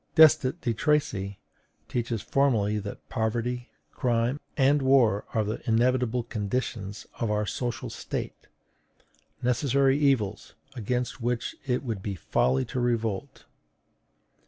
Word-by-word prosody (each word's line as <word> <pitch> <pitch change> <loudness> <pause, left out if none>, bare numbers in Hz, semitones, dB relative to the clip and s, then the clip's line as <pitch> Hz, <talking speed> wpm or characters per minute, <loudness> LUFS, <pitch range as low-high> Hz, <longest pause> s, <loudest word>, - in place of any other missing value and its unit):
Destutt 155 -1 +6
de 120 - 0
Tracy 110 -8 0 0.5
teaches 120 -3 -2
formally 110 -7 +2
that 100 0 -8
poverty, 120 +2 -2 0.2
crime, 120 +1 0 0.2
and 140 +1 +4
war 130 -6 +4
are 110 - +3
the 105 +2 -3
inevitable 125 +1 +2
conditions 105 -2 -3
of 115 - 0
our 105 0 +1
social 120 +2 -3
state; - - -5 1.0
necessary 135 +2 +3
evils, 120 -9 +1 0.2
against 125 +2 -2
which 120 0 -1
it 125 0 0
would 115 -6 -3
be 100 0 -3
folly 65 -5 +1
to 130 - -4
revolt. 115 0 -1
120 Hz, 115 wpm, -27 LUFS, 105-130 Hz, 1.0 s, Destutt